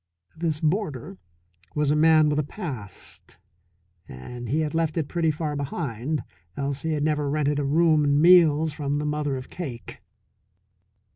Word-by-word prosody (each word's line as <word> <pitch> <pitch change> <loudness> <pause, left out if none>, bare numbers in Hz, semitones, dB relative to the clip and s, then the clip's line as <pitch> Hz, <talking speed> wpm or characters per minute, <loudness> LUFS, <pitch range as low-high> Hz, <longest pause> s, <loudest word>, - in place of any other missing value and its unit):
This 160 -2 -2
boarder 150 - -2 0.6
was 150 -1 +1
a - - +3
man 155 0 +5
with 150 0 +1
a - - +1
past. 135 - -8 0.7
And 120 - -8
he 155 +4 +1
had 150 -2 -2
left 165 0 0
it 155 -3 0
pretty 170 -1 0
far 155 -1 -2
behind, 140 -1 -3 0.3
else 140 0 -2
he 160 -1 -1
had 150 -1 -1
never 150 -2 0
rented 145 0 0
a - - 0
room 155 +2 +3
and 145 0 +3
meals 160 -3 +5
from 145 -1 -2
the 150 - -2
mother 150 -2 -1
of 130 - -9
Cake. 120 - -7
150 Hz, 160 wpm, -25 LUFS, 140-160 Hz, 0.7 s, man